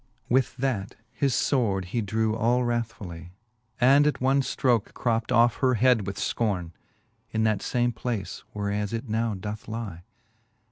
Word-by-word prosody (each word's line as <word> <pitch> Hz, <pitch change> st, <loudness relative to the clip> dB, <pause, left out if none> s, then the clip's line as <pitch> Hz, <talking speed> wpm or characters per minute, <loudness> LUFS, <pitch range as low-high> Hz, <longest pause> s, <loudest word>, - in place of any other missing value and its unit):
With 130 Hz, 0 st, +2 dB
that 125 Hz, -7 st, -2 dB, 0.2 s
his 140 Hz, -3 st, 0 dB
fword 105 Hz, -9 st, +1 dB
he 115 Hz, +6 st, -2 dB
drew 110 Hz, +1 st, 0 dB
all 120 Hz, +2 st, +2 dB
wrathfully, 100 Hz, -8 st, -4 dB, 0.5 s
And 140 Hz, +4 st, +6 dB
at 150 Hz, -, 0 dB
one 135 Hz, +2 st, +3 dB
ftroke 120 Hz, -4 st, 0 dB
cropt 115 Hz, -2 st, 0 dB
off 120 Hz, 0 st, +4 dB
her 130 Hz, -2 st, +2 dB
head 120 Hz, -3 st, +3 dB
with 100 Hz, -, -4 dB
Icorne, 95 Hz, -7 st, -1 dB, 0.6 s
In 110 Hz, 0 st, 0 dB
that 110 Hz, -2 st, +1 dB
far 120 Hz, -1 st, 0 dB
3 120 Hz, -, +2 dB
place 110 Hz, -4 st, -4 dB
whereas 105 Hz, 0 st, -2 dB
it 115 Hz, +3 st, -3 dB
now 110 Hz, 0 st, 0 dB
doth 105 Hz, +3 st, -6 dB
lie. 110 Hz, -7 st, -5 dB
115 Hz, 155 wpm, -26 LUFS, 105-125 Hz, 0.6 s, And